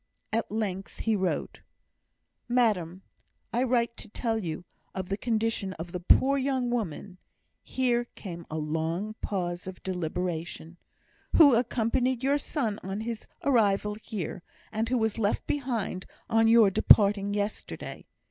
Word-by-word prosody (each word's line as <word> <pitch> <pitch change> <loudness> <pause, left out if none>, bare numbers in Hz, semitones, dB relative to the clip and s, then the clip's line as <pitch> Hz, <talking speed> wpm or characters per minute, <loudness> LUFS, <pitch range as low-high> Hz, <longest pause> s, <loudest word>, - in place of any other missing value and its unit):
At 225 -2 0
length 195 -3 -3
he 225 -1 +2
wrote: 190 -2 -2 0.9
MADAM, 195 -7 +1 0.5
I 240 - +2
write 240 -2 +1
to 220 - -7
tell 225 +1 -1
you 165 +1 -4 0.3
of 185 -1 -4
the 195 - +1
condition 225 -3 -1
of 170 0 -7
the 180 - -3
poor 270 +10 +4
young 260 -2 0
woman 200 -4 -3 0.4
[here 245 -2 0
came 170 -4 -8
a 155 - -4
long 160 +7 -2
pause 175 -2 -3
of 185 -1 -8
deliberation] 175 -1 -3 0.6
who 290 -5 +8
accompanied 245 +2 +1
your 280 +2 +3
son 230 -8 -2
on 195 +3 -4
his 230 0 -5 0.2
arrival 210 -5 +3
here, 200 -6 -5 0.3
and 225 +1 -1
who 255 - +2
was 220 -1 0
left 205 -1 0
behind 235 -9 -2 0.2
on 225 0 +4
your 225 -3 +6
departure 200 +1 +6
yesterday. 205 +1 -4
215 Hz, 140 wpm, -28 LUFS, 185-235 Hz, 0.9 s, who